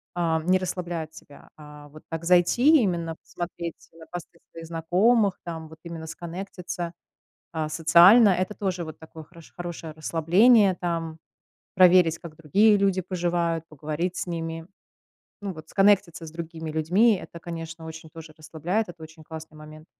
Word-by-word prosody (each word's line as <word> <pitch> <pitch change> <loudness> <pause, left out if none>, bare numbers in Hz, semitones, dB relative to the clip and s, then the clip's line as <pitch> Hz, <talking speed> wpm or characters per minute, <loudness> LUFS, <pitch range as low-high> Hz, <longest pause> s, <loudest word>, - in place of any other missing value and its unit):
э, 165 -2 +1
не 185 +2 +3
расслабляет 175 -3 -4
тебя. 145 - -15
А 150 -1 -13
вот 155 +1 -15
так 165 0 -5
зайти, 240 - +5
именно 170 -5 -1
посмотреть 170 -1 -7
на 165 -1 -14
посты 175 -1 -9
своих 165 0 -9
знакомых 185 +6 +2
там, 160 -2 -6
вот 160 - -13
именно 165 -2 -7
сконнектиться, 175 +1 -6 0.6
э, 155 -2 -2
социально. 170 +8 +7
Это 185 +2 0
тоже 185 -4 -3
вот 155 - -9
такое 160 0 -12
хоро 170 +2 -16 0.2
хорошее 170 -2 -6
расслабление, 185 +6 +4
там 165 -2 -3 0.6
проверить, 180 -3 +5
как 160 -2 -11
другие 200 +8 +4
люди 195 -2 +2
поживают, 170 -2 -1
поговорить 155 +4 -4
с - - -3
ними. 165 -1 -5 0.7
Ну 200 -2 -4
вот 155 -1 -12
сконнектиться 195 -4 +2
с 155 - -9
другими 165 -1 -7
людьми- 180 +8 +3
это, 170 - -11
конечно, 165 -1 -7
очень 160 0 -9
тоже 160 -1 -12
расслабляет. 175 +7 -3
Это 170 -2 -12
очень 160 0 -13
классный 160 0 -10
момент. 155 +1 -12
170 Hz, 155 wpm, -25 LUFS, 160-180 Hz, 0.7 s, социально